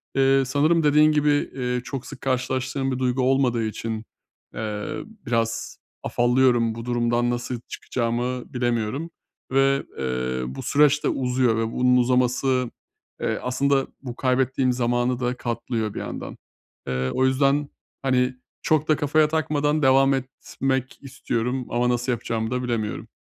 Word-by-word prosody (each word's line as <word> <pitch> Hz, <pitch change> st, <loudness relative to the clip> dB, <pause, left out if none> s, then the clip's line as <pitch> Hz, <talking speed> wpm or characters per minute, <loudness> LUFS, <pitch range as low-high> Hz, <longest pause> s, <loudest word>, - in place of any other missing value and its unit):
Eee, 135 Hz, 0 st, +4 dB
sanırım 155 Hz, +5 st, +2 dB
dediğin 150 Hz, +1 st, +5 dB
gibi, 150 Hz, 0 st, +2 dB, 0.3 s
eee, 125 Hz, -1 st, -1 dB
çok 135 Hz, -1 st, -5 dB
sık -, -, -10 dB
karşılaştığım 130 Hz, +1 st, -1 dB
bir 130 Hz, -, -2 dB
duygu 130 Hz, 0 st, +1 dB
olmadığı 130 Hz, -3 st, +2 dB
için, 110 Hz, 0 st, -4 dB, 0.5 s
eee, 105 Hz, -1 st, -4 dB, 0.3 s
biraz 115 Hz, -1 st, -1 dB, 0.3 s
afallıyorum, 120 Hz, -2 st, +2 dB
bu 115 Hz, 0 st, -7 dB
durumdan 120 Hz, 0 st, +1 dB
nasıl 120 Hz, 0 st, -3 dB
çıkacağımı 120 Hz, +1 st, -3 dB
bilemiyorum 120 Hz, +5 st, -1 dB, 0.4 s
ve, 135 Hz, 0 st, +3 dB, 0.2 s
eee, 65 Hz, -1 st, -2 dB
bu -, -, -6 dB
süreç 150 Hz, 0 st, +3 dB
de -, -, +2 dB
uzuyor 125 Hz, -3 st, +1 dB
ve 115 Hz, 0 st, -1 dB
bunun 125 Hz, 0 st, +3 dB
uzaması, 125 Hz, 0 st, +2 dB, 0.5 s
eee, -, -, -1 dB
aslında 135 Hz, +2 st, +1 dB
bu 125 Hz, -3 st, -7 dB
kaybettiğim 130 Hz, 0 st, +1 dB
zamanı 120 Hz, 0 st, 0 dB
da 125 Hz, 0 st, -1 dB
katlıyor 115 Hz, -2 st, -3 dB
bir -, -, -4 dB
yandan. -, -, -6 dB, 0.5 s
Eee, 65 Hz, 0 st, -1 dB
o 130 Hz, +1 st, +2 dB
yüzden, 140 Hz, +2 st, +2 dB, 0.3 s
hani, 130 Hz, -1 st, +1 dB, 0.3 s
çok 155 Hz, -1 st, +1 dB
da 155 Hz, -, +4 dB
kafaya 150 Hz, +1 st, +3 dB
takmadan 150 Hz, -1 st, 0 dB
devam 135 Hz, +1 st, +5 dB
etmek 130 Hz, 0 st, -3 dB
istiyorum 125 Hz, -1 st, -2 dB
ama 120 Hz, +1 st, +1 dB
nasıl 125 Hz, +1 st, 0 dB
yapacağımı 115 Hz, -1 st, -2 dB
da 125 Hz, 0 st, -1 dB
bilemiyorum. 115 Hz, -4 st, -2 dB
125 Hz, 140 wpm, -24 LUFS, 120-135 Hz, 0.5 s, dediğin